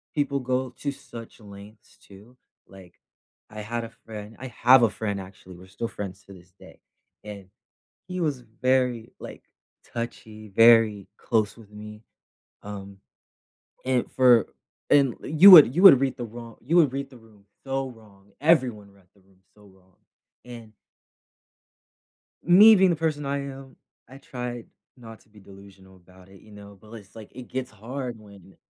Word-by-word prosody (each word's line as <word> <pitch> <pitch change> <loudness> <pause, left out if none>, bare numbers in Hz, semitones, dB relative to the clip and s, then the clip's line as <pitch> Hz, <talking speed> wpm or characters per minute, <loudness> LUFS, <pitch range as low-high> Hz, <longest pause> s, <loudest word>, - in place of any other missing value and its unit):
people 140 -2 -1
go 130 0 -3
to 140 - -3
such 120 -5 -13
lengths, 105 0 -16
too, 105 +6 -19 0.3
like, 95 -3 -17 0.6
I 105 0 -8
had 115 +2 -5
a 115 - -8 0.2
friend 105 0 -10
I 130 - -8 0.2
have 125 +2 +7
a 115 - +3
friend, 100 -2 -5
actually, 95 -1 -14
we're 90 +1 -16
still 100 +5 -6
friends 100 -2 -9
to 100 - -15
this 90 -2 -18
day, - - -17 0.4
and 105 -2 -10 0.6
he 185 0 -6
was 150 -6 -2
very, 125 0 -2
like, - - -11 0.5
touchy, 110 -2 -8
very 115 -3 +4
close 110 -3 -2
with 110 -3 -17
me, 105 +1 -12 0.6
um, 100 -1 -10 0.9
and 130 -1 -1
for 125 -4 +4 0.4
and 135 -4 +3
you 170 +6 +7
would 150 -7 +9
you 180 - +1
would 175 -10 +9
read 135 -2 -2
the 120 - -6
wro 115 0 -12
you 155 +9 0
would 150 -7 +3
read 140 0 -5
the 130 - -16
room 110 -3 -22 0.2
so 135 0 -3
wrong 100 -4 -19
everyone 130 -10 +1
read 100 -1 -25
the - - -26
room 95 0 -30 0.2
so 105 - -22
wrong, 95 -2 -25 0.5
and 120 -3 -12 1.7
me 205 +6 +7
being 190 -1 +3
the - - 0
person 155 -2 -3
I 140 +1 -3
am, 135 0 -14 0.3
I 135 - -13
tried 125 -3 -8 0.3
not 115 -3 -14
to - - -29
be 105 0 -19
delusional 95 -1 -17
about 90 +1 -21
it, 95 0 -18
you 110 - -19
know? 100 -1 -14
But 110 - -20
l - - -14
it's 105 -2 -15
like, 110 -2 -13
it 125 -1 -10
gets 130 -1 -5
hard 120 +4 -7
when 100 -3 -18
115 Hz, 170 wpm, -24 LUFS, 100-130 Hz, 1.7 s, would